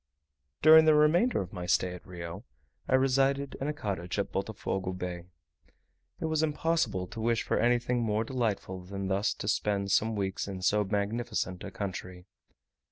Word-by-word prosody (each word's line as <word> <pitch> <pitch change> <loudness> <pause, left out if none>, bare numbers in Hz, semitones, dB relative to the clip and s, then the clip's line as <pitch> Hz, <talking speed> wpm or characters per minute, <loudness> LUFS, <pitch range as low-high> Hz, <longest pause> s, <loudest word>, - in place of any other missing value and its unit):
During 160 +1 +9
the 155 -1 +6
remainder 165 +11 +4
of 90 - -12
my 90 -2 -5
stay 90 0 +2
at 90 - -10
Rio, 85 +2 -7 0.4
I 130 - +3
resided 135 +1 +2
in 140 - -1
a - - +1
cottage 95 - -4
at 100 - -1
Botofogo 95 -2 -3
Bay. 90 -1 -5 0.9
It - - -3
was 160 -1 +1
impossible 150 - 0
to 110 +5 -8
wish 115 0 +1
for - - 0
anything 120 +1 +2
more 110 -1 0
delightful 110 -7 -2
than 95 +1 -5
thus 100 +2 +1
to - - -6
spend 100 -1 0
some 110 +2 +2
weeks 95 -1 -2
in 95 -2 -6
so 105 +3 +3
magnificent 105 -1 -2
a 100 - -5
country. 90 -2 -6
105 Hz, 165 wpm, -29 LUFS, 95-130 Hz, 0.9 s, During